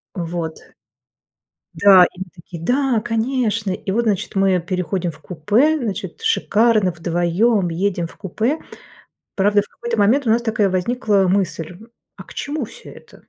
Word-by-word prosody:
Вот. 170 -2 -4 1.2
Да, 185 +1 +7
и 185 - -15
мы 190 - -4
такие: 170 0 -10
"Да, 255 +1 +1
конечно!" 225 -2 -1
И 190 +1 -4
вот, 235 +4 +1
значит, 205 -4 -1
мы 195 -1 +3
переходим 180 0 -2
в 145 - -17
купе, 210 - +1
значит, 235 - -5
шикарно, 230 - +2
вдвоём, 175 +4 +1
едем 175 0 -1
в - - -17
купе. 220 - -2 0.8
Правда, 205 +1 +3
в 205 - -16
какой-то 235 -1 -5
момент 235 +7 +3
у - - +2
нас 230 +2 +3
такая 220 -4 +1
возникла 200 +1 +1
мысль- 180 -3 -1 0.4
а - - -10
к - - -15
чему 290 -1 -3
всё 220 - -12
это? - - -16
200 Hz, 155 wpm, -20 LUFS, 180-230 Hz, 1.2 s, Да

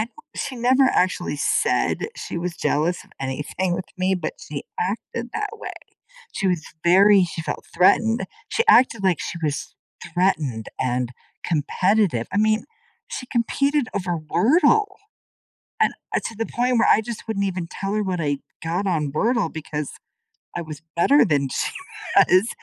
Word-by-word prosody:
thought 455 - -18
she 270 -3 -4
never 255 +3 +4
actually 180 - +1
said 425 - +1
she - - -5
was 175 0 -4
jealous 165 +3 0
of - - -24
anything 150 +7 -2
with 185 +1 -3
me, 185 +1 +2
but 175 -4 -3
she 145 -2 -6
acted 230 +5 -3
that 420 -1 -2
way. 450 - -7 0.6
She 195 - -2
was 175 -4 0 0.2
very 195 +2 +6
she 170 -1 -4
felt - - -5
threatened, 225 +6 +3 0.2
she 460 - +1
acted 250 - +5
like 185 -5 +2
she 170 - -4
was 150 -1 -2 0.4
threatened 155 - 0
and 125 -1 0 0.3
competitive. 175 - +1
I - - +1
mean, 215 +1 +2 0.4
she 255 - -6
competed 275 +3 +1
over 180 -3 -1
Wordle, 295 - +3 1.0
and, - - +4 0.2
uh, - - +3
to 225 - -4
the 225 - -2
point 245 0 +1
where 230 - +4
I 210 - +6
just 230 0 -7
wouldn't 200 -3 -1
even 180 -2 -3
tell 195 +3 -4
her 215 - +1
what 185 -3 -2
I 145 -2 0 0.2
got 175 +5 -1
on 155 -6 0
Wordle, 225 +1 +1
because 150 -2 -4 0.7
I 175 - -2
was 155 -1 -9
better 275 +11 +5
than 145 -7 +1
she - - -2 0.4
was, 190 +5 +5
185 Hz, 160 wpm, -23 LUFS, 160-230 Hz, 1.0 s, very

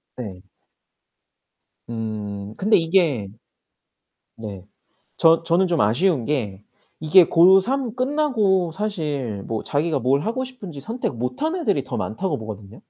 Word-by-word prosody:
네. 100 -7 -7 1.5
음 105 -2 -5
근데 210 +3 +4
이게 165 - +1 1.1
네 100 -4 -8 0.5
저 165 0 +4
저는 175 +3 +2
좀 170 -3 0
아쉬운 125 - +2
게 105 -9 -2 0.4
이게 165 +3 +6
고 185 +3 +7
3 255 +2 -2
끝나고 250 - +1
사실 150 - -3
뭐 110 +1 -3
자기가 155 +2 0
뭘 135 +4 +2
하고 235 +9 -2
싶은지 200 - -9
선택 230 - -3
못 125 - -4
한 320 +3 0
애들이 205 - 0
더 130 - -5
많다고 185 - -2
보거든요. 110 -1 -9
160 Hz, 225 characters per minute, -22 LUFS, -, 1.5 s, 고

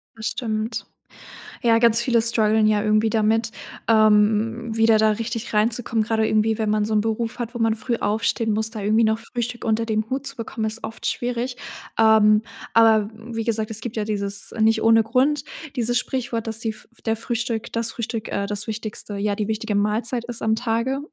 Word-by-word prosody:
Das 220 -1 -4
stimmt. 220 -2 -3 0.8
Ja, 230 -1 +4
ganz 230 0 +4
viele 235 -1 +2
strugglen 220 -1 +3
ja 210 -1 +2
irgendwie 215 +1 +2
damit, 220 +1 +1 0.4
ähm, 220 +1 +3
wieder 225 0 +4
da 215 0 +4
richtig 230 +2 -3
reinzukommen, 225 +1 +1
gerade 220 0 +1
irgendwie, 215 +1 +2
wenn 215 -1 -1
man 210 0 +1
so 220 - -1
'n 210 - +3
Beruf 225 +1 -2
hat, 240 0 -5
wo - - -4
man 225 -1 +2
früh 235 +2 -2
aufstehen 220 +1 0
muss, 220 +1 0
da 220 -2 -6
irgendwie 215 +3 +3
noch 220 0 +2
Frühstück 240 +1 -5
unter 225 0 +1
dem 220 -1 -1
Hut 265 +2 -3
zu 275 0 -4
bekommen, 225 -1 -4
ist 220 +1 -2
oft 225 +1 -7
schwierig. 245 +1 -2 0.4
Ähm, 215 -1 +5 0.3
aber 220 -2 +4
wie 225 +1 -6
gesagt, 220 -1 -1
es 220 0 -4
gibt 230 -1 -5
ja 215 - -1
dieses 200 -1 -2
nicht 220 0 +3
ohne 225 0 +5
Grund, 260 +6 +1 0.3
dieses 240 0 +1
Sprichwort, 240 -3 -3
dass 225 0 -4
die 225 -1 -2 0.3
der 225 -1 0
Frühstück 230 0 -3
das 230 0 0
Frühstück, 230 -1 -4
äh, 200 0 -1
das 205 0 -1
Wichtigste 215 -1 -5
ja, 205 0 0
die 210 0 -2
wichtige 220 0 -2
Mahlzeit 225 +4 0
ist 240 -1 -4
am 220 0 +1
Tage, 230 +3 -1
225 Hz, 195 wpm, -22 LUFS, 215-230 Hz, 0.8 s, Ähm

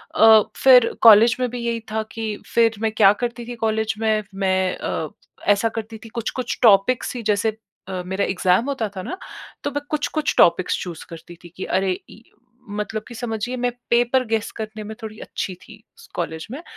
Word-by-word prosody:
अ, 220 -1 +7 0.2
फिर 250 -3 +7
कॉलेज 230 +1 +8
में 250 -1 0
भी 245 +1 -6
यही 235 -1 -1
था 220 0 -1
कि 220 -2 -4 0.2
फिर 230 -1 +4
मैं 220 -1 +1
क्या 215 -2 +6
करती 240 0 -3
थी 245 - -6
कॉलेज 220 0 0
में 220 -1 +1
मैं 190 -1 +1
अ, - - -3 0.4
ऐसा 205 +2 +3
करती 225 0 -6
थी - - -10
कुछ-कुछ 240 +2 -4
टॉपिक्स 225 +4 +4
ही 240 - -5
जैसे 215 +1 0 0.3
अ, 185 -1 -4
मेरा 190 +2 -1
एग्ज़ाम्स 185 +5 +1
होता 240 -6 -2
था - - -3
ना 370 - -5 0.5
तो 285 - -2
मैं 290 +1 -3
कुछ-कुछ 305 0 -1
टॉपिक्स 175 +1 +4
चूज़ 170 -3 -8
करती 165 +1 -11
थी 175 - -11
कि 190 - -4
अरे 190 0 0 0.2
इ 225 - -14 0.5
मतलब 210 +1 -4
कि - - -10
समझिए 225 +1 -3
मैं 245 0 0 0.2
पेपर 245 +2 +3
गेस 225 -1 -1
करने 215 -1 -6
में 215 +1 -8
थोड़ी 215 -1 -8
अच्छी 190 - -5
थी 215 - -14 0.2
स - - -16
कॉलेज 160 -2 -4
में। 275 +5 -6
220 Hz, 195 wpm, -22 LUFS, 200-235 Hz, 0.5 s, कॉलेज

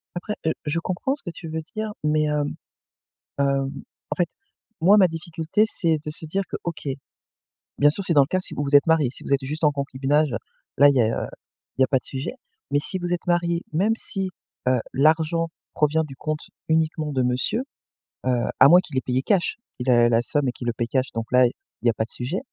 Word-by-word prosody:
Après, 210 +4 -4
heu, 160 - +2
je 150 +3 0
comprends 185 +10 -2
ce 290 - -3
que 175 - -5
tu 165 - -9
veux 160 +1 -3
dire, 215 0 -3
mais, 155 0 +2
hem, 150 -1 -1 0.9
heu, - - +4 0.7
en - - 0
fait, 175 -3 +1 0.5
moi 195 +5 +7
ma 185 -3 +6
difficulté 165 +4 -1
c'est 165 -6 +1
de 150 - -3
se 160 +1 +3
dire 195 +6 -1
que - - -3
OK, 160 -4 -5 0.9
bien 145 +1 +6
sûr 180 +7 +4
c'est 175 - +2
dans 145 - +7
le - - +1
cas 185 +5 0
si - - +2
vous 145 - -2
vous 140 0 -2
êtes 145 - +4
mariés, 160 -6 +3
si - - -4
vous - - -3
êtes 135 -1 -1
juste 150 +4 -3
en 150 - +6
concubinage 140 +1 0 0.5
là 145 - +8
il 140 - +4
y - - +5
a - - +3 0.7
il - - +4
y - - +7
a - - +1
pas 135 - +3
de - - -17
sujet. 135 0 -4 0.4
Mais 145 - +2
si 185 +5 +1
vous 175 -1 -3
êtes 175 - -6
mariés, 170 -1 +1
même 200 +8 +2
si, 195 -4 -1 0.4
heu, 130 -1 +3
l'argent 160 +3 +2 0.3
provient 155 +1 +2
du 135 -3 -10
compte 155 +1 -4 0.2
uniquement 160 -1 0
de 130 - +1
monsieur, 125 - +1 0.6
heu, - - +3 0.3
à 130 - +9
moins 175 +3 +8
qu'il 170 -7 -7
ait - - -1
payé 130 +1 +1
cash. 185 +3 +1 0.2
Il 125 +1 -1
a 120 -1 +5
la 115 0 +3
somme 145 +2 0
et - - 0
qu'il 120 - -8
le 120 - +1
paie 120 - -2
cash, 130 +2 -1
donc 115 0 -3
là 125 0 +6
il 120 - -2 0.3
y 120 - +4
a - - -3
pas 110 - -1
de 115 - -13
sujet. 130 +10 -2
155 Hz, 235 wpm, -23 LUFS, 135-170 Hz, 0.9 s, à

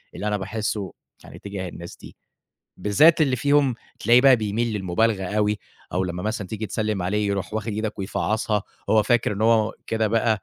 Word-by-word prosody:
اللي 105 - -4
أنا 105 0 0
باحِسّه 105 0 -3 0.3
يعني - - -12
تجاه 100 -3 -6
الناس 85 0 -9
دي، - - -13 0.6
بالذات 155 +12 +4
اللي 135 -4 +3
فيهم 140 -1 +3 0.3
تلاقي 120 +3 +5
بقى 135 -1 +7
بيميل 110 +1 -1
للمُبالغة 95 +2 0
أوي 105 +2 0 0.3
أو 95 +1 0
لمّا 90 0 -4
مثلًا 105 -1 -3
تيجي 110 +2 -5
تسلِّم 105 -3 -2
عليه، 105 +3 0
يروح 100 +1 -3
واخِد 110 0 -2
إيدك 110 0 -3
ويفعَّصها، 105 +2 -1 0.3
هو 110 -1 +5
فاكر 115 0 +2
إنه 105 +2 -1
هو 115 -1 +3
كده 110 -1 0
بقى 110 -1 +1
105 Hz, 180 wpm, -23 LUFS, 100-115 Hz, 0.6 s, بقى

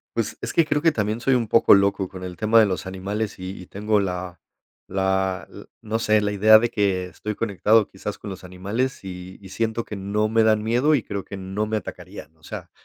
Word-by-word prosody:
Pues 115 -2 -2
es - - -4
que 165 - +4
creo 150 -1 0
que 165 - +4
también 110 -2 -2
soy 135 0 +3
un 115 -3 0
poco 115 - +6
loco 100 -1 +2
con 90 -1 -9
el 90 -1 -6
tema 110 +6 +4
de 110 - +6
los 95 -1 -3
animales 100 +3 -4
y 95 +1 -7
y 90 - -12
tengo 105 +1 0
la 90 -2 -4 0.5
la 95 -1 0
l - - -11 0.2
no 110 +1 -2
sé, 110 -1 +3
la 105 0 0
idea 110 +2 +7
de 120 +1 +1
que 95 -3 0
estoy 105 +4 -6
conectado 110 0 +2
quizás 100 +2 -6
con 100 - -8
los 95 - -9
animales 100 +9 -3
y 90 0 -8
y 95 -2 -13
siento 115 +2 -2
que 105 - -7
no 100 +2 -1
me 110 +1 +2
dan 110 -1 +3
miedo 125 +7 +3
y 125 - -1
creo 100 -1 -5
que 100 - -8
no 95 +3 -3
me 110 - 0
atacarían. 80 -5 -9
O - - -31
sea, - - -8
105 Hz, 235 wpm, -23 LUFS, 95-110 Hz, 0.5 s, idea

